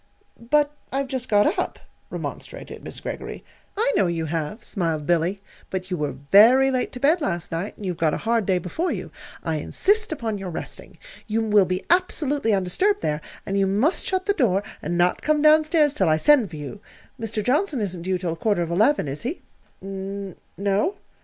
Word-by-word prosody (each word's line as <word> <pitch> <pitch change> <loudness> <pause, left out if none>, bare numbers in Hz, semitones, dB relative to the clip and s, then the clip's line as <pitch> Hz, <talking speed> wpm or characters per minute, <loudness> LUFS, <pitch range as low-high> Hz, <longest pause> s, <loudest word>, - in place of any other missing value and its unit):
"But 295 0 +3 0.2
I've 275 +1 -1
just 255 -1 -3
got 220 - +3
up," - - -2 0.3
remonstrated - - -7
Miss - - -7
Greggory. - - -6 0.3
"I 465 +4 +2
know - - +3
you 165 -1 -1
have," 160 +7 -3
smiled 165 -6 -2
Billy; 175 +4 +1 0.3
"but 185 0 -4
you 180 - 0
were 150 -4 -2 0.2
very 255 +7 +7
late 255 -1 -1
to 250 - -5
bed 310 +6 +3
last 175 - -2
night, 170 +5 -4
and 205 - -8
you've 180 -3 -2
got 160 -2 +2
a - - -7
hard 230 -3 +1
day 190 -2 +3
before 185 - -2
you. - - -5 0.3
I 160 -2 -1
insist 410 - +1
upon 225 -9 -3
your 190 -1 -5
resting. 165 - -7 0.3
You 225 +1 0
will 205 -2 +5
be 185 +1 -2
absolutely 295 -8 +2
undisturbed 210 - +1
there, 150 0 -1 0.2
and 195 +1 -1
you 195 - +3
must 215 - +2
shut 375 0 0
the 405 - +2
door 205 - +2 0.2
and 175 +3 -2
not 175 +1 +2
come 305 0 +2
down 310 0 +6
stairs 305 -2 +3
till 295 - +2
I 155 - +4
send 255 - +4
for 160 - -9
you. 150 +7 -7 0.4
Mr. 220 -1 -2
Johnson 290 - +1
isn't 185 -5 -3
due 185 +1 0
till 175 -2 -3
quarter 200 0 +1
of 170 - -5
eleven, 215 - +3
is 140 +2 -4
he?" 270 +9 -4 0.4
"N 195 0 -6 0.2
no." 200 - +1
205 Hz, 200 wpm, -24 LUFS, 180-290 Hz, 0.4 s, very